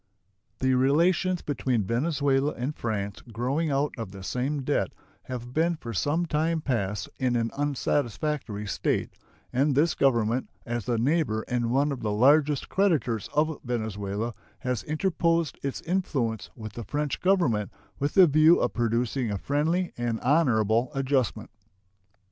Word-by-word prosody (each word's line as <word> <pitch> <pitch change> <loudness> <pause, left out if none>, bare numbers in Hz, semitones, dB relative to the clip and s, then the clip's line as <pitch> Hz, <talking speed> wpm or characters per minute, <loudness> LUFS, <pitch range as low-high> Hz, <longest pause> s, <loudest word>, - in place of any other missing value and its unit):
The 130 0 +1
relations 170 +7 +2
between 130 -5 0
Venezuela 140 - +1
and 130 +5 -3
France 100 -3 -3
growing 135 +8 -1
out 140 +1 0
of 110 -4 -5
the 95 -1 -9
same 135 +7 -2
debt 130 -8 +1 0.4
have 125 -1 -6
been 170 +3 +2
for 120 -7 -7
some 150 - 0
time 160 +1 0
past 105 -9 -2
in 125 -2 +1
an 115 -1 0
unsatisfactory 140 -4 -1
state, 100 - -1 0.4
and 135 +2 +2
this 155 +4 +3
Government, 120 -2 +1 0.2
as 120 -3 -3
the 120 - 0
neighbor 120 -3 +1
and 120 -2 0
one 140 +4 +2
of 135 - -4
the 105 - -1
largest 140 +6 +4
creditors 155 - +1
of 155 0 +1
Venezuela, 110 -2 -3 0.3
has 125 -3 -1
interposed 165 -1 0
its 135 -1 -3
influence 135 - -1
with 110 -3 -8
the 120 - -6
French 145 +3 -2
Government 170 - +2 0.3
with 145 +1 -1
the 190 - +9
view 155 +2 +5
of - - 0
producing 120 +1 0
a 100 - -1
friendly 160 - 0
and 120 -2 -1
honorable 120 -5 +3
adjustment. 130 -5 0
130 Hz, 145 wpm, -27 LUFS, 115-150 Hz, 0.4 s, the